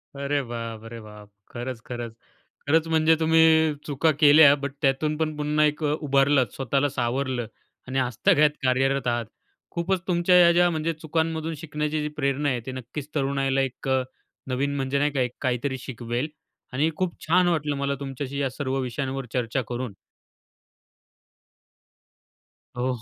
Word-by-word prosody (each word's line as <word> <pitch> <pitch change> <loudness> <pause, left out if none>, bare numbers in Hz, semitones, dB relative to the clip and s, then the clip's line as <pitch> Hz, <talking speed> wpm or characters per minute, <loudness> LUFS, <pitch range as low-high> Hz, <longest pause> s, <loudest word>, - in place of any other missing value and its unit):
अरे 140 +1 -1
बापरे 115 -1 -6
बाप! 105 -1 -13 0.2
खरंच, 120 0 -5
खरंच. 120 -2 -6 0.5
खरंच, 160 +2 +3
म्हणजे 160 0 +4
तुम्ही 160 -1 +4
चुका 150 +2 +2
केल्या, 145 -1 +8
बट 140 -1 -4
त्यातून 150 +3 +1
पण 155 -1 -1
पुन्हा 150 +1 +2
एक 150 +1 -1
अ, 150 - +2
उभारलं 135 -2 +3
स्वतःला 135 +2 0
सावरलं 125 -1 -2 0.4
आणि 135 +1 -1
आजतागायत 130 +4 +3
कार्यरत 130 0 +1
आहात. 120 -1 0 0.5
खूपच 180 +2 0
तुमच्या 180 0 +3
या 170 -1 +7
ज्या 175 0 +4
म्हणजे 165 0 -1
चुकांमधून 160 0 -2
शिकण्याची 150 0 -3
जी 150 - -2
प्रेरणा 140 +1 0
आहे, 125 -2 0
ती 130 - -4
नक्कीच 135 +3 -7
तरुणाईला 135 -1 +1
एक 135 0 -4
अ, 130 -1 +2 0.4
नवीन 140 +2 -1
म्हणजे 135 0 -1
नाही 150 +1 +2
का, 135 -2 0
एक 125 -1 0
काहीतरी 130 +1 -1
शिकवेल 120 +2 -4 0.5
आणि 150 +5 +2
खूप 185 -2 -2
छान 180 +2 +4
वाटलं 150 -4 0
मला 140 0 -1
तुमच्याशी 140 0 -5
या 135 - 0
सर्व 135 0 -3
विषयांवर 130 +1 -3
चर्चा 125 +1 0
करून. 125 -3 -4 2.8
हो, 125 +1 -1
140 Hz, 150 wpm, -25 LUFS, 130-155 Hz, 2.8 s, केल्या